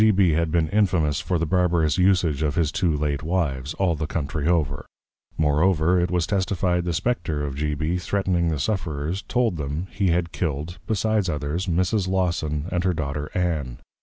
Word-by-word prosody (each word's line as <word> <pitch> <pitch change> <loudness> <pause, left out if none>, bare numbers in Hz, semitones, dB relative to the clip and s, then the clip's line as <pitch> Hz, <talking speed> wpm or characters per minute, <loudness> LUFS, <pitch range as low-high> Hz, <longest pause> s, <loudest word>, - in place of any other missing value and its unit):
Now, - - +7
G. - - +6
B. 95 -4 +4
had 80 +1 +1
been 80 -1 +1
Infamous 90 -8 +2
for 85 +2 -1
the 85 - 0
Barbarous 85 -2 +2
usage 90 -6 +3
of 75 -2 0
his 80 -3 +1
two 90 +1 +1
late 70 -1 -1
Wives, 75 -4 -1
all 95 -3 +1
the 75 -1 -3
Country 75 -1 -2
over. 75 -4 0 0.5
Moreover, 80 +3 +3
it 90 - 0
was 90 -1 +1
testified, 90 -2 0
the 85 - 0
Spectre 80 -6 -1
of 70 - -4
G. 75 +1 -1
B. 80 +4 -1
threatning 90 -1 0
of 80 - +1
the 75 - -3
Sufferers, 85 -2 -2
told 115 -4 0
them, 75 +4 -3
he 100 -2 0
had 85 -1 +1
Killed 80 +1 -3
(besides 110 -2 +1
others) 75 +5 -2
Mrs. 90 +3 +1
Lawson 85 -5 0
and 90 -1 0
her 90 -2 +1
Daughter 75 -1 -3
Ann. 75 -9 -1
85 Hz, 195 wpm, -24 LUFS, 75-90 Hz, 0.5 s, Now